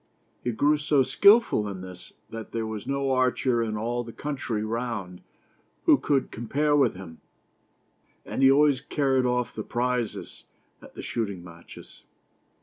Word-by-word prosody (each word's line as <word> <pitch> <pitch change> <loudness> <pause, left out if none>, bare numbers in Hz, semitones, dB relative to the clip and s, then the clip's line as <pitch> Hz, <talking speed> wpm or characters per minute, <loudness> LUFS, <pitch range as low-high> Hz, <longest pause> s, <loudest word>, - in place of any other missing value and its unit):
He 120 - 0
grew 145 +6 +2
so 150 -2 +2
skillful 200 - +4
in 95 -2 -7
this 90 -1 -10 0.2
that 115 -1 -8
there 115 -1 -2
was 110 -2 -6
no 140 0 -1
archer 130 -1 +1
in 110 -2 -2
all 120 +3 -2
the 115 - -9
country 130 -6 -3
round 110 -6 -4 0.6
who - - +6
could 140 -2 0
compare 145 +6 0
with 140 -8 +3
him, 85 -4 -10 1.1
and - - -4
he 135 - +7
always 140 -1 +4
carried 135 -3 +1
off 125 0 -1
the 110 - -5
prizes 120 +1 -3 0.4
at - - -15
the - - -7
shooting 100 -6 -3
matches. 85 -1 -14
120 Hz, 150 wpm, -26 LUFS, 110-135 Hz, 1.1 s, he